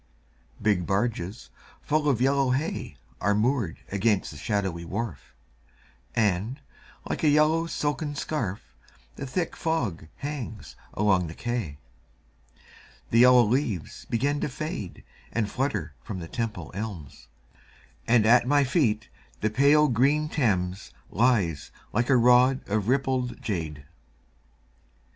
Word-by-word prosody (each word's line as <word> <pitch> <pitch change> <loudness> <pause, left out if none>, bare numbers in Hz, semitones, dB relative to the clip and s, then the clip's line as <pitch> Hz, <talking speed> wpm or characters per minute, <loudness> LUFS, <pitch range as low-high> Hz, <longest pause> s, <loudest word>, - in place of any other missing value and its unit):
Big 100 -5 +1
barges 100 0 -2 0.3
full 150 0 +1
of 130 -5 +2
yellow 135 +1 +2
hay 135 +6 -2 0.2
Are 100 +2 +2
moored 110 - 0
against 100 0 +1
the 75 - -10
shadowy 95 -1 -2
wharf, 105 - -5 0.8
And, 110 +4 +1 0.5
like - - -3
a 155 - +5
yellow 155 +3 +3
silken 145 -1 -2
scarf, 120 -10 -4 0.4
The 140 - -6
thick 170 +6 -2
fog 120 - -2
hangs 140 -7 -6 0.2
along 95 -4 +2
the 80 - -8
quay. 120 -12 -3 1.3
The 115 - +4
yellow 125 0 +8
leaves 115 - -1
begin 140 +5 0
to - - -1
fade 130 - -6 0.3
And 110 -3 -1
flutter 105 - -2
from 105 - -6
the 85 -2 -6
Temple 110 -6 -4
elms, 90 - -7 0.8
And 115 -2 +4
at 120 +2 +5
my 145 +1 +4
feet 125 -7 +1 0.3
the 110 - +1
pale 145 +5 +5
green 145 +5 +2
Thames 95 - -1 0.2
Lies 100 - +1 0.2
like 120 +4 +1
a 130 - +6
rod 125 +2 +4
of 105 0 -1
rippled 130 -1 0
jade. 80 -8 -4
115 Hz, 125 wpm, -26 LUFS, 100-135 Hz, 1.3 s, yellow